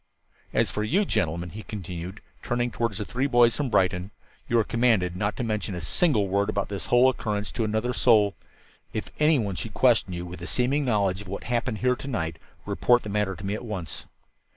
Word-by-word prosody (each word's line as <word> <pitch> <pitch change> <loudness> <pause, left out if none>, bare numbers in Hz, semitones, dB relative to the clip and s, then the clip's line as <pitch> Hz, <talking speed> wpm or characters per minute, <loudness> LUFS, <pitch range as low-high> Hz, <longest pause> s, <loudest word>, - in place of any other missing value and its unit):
"As - - +1
for 105 - -2
you 185 - +2
gentlemen," 85 - -1
he 110 - -7
continued, 95 -1 -7 0.2
turning 120 0 -1
toward 115 -2 -1
the 105 +1 -3
three 130 +6 -1
boys 120 -3 +5
from 145 -3 -1
Brighton, 95 -3 +1 0.4
"you 120 - +3
are 115 - +4
commanded 110 -7 +2
not 100 +3 -1
to - - -2
mention 105 -4 -2
a - - -4
single 105 - +2
word 100 +2 +1
about - - -1
this 100 -1 -5
whole 120 +1 +5
occurrence 105 -5 -1
to 115 - -2
another 110 +3 0
soul. 105 -5 +4 0.6
If 110 - -4
any 150 0 +5
one 105 -6 -1
should 100 +3 -5
question 115 -7 +3
you, 85 0 -4
with 90 0 -9
a 85 - -5
seeming 135 +6 +1
knowledge 100 -5 +1
of 105 - -11
what 100 +2 -5
happened 120 -1 -1
here 125 +3 +2
to 135 - -9
night, 80 - -3 0.3
report 120 0 +3
the 105 - -6
matter 100 -2 0
to 95 - -9
me 100 - -1
at 110 - -4
once." 95 -10 -5
105 Hz, 215 wpm, -26 LUFS, 95-120 Hz, 0.6 s, boys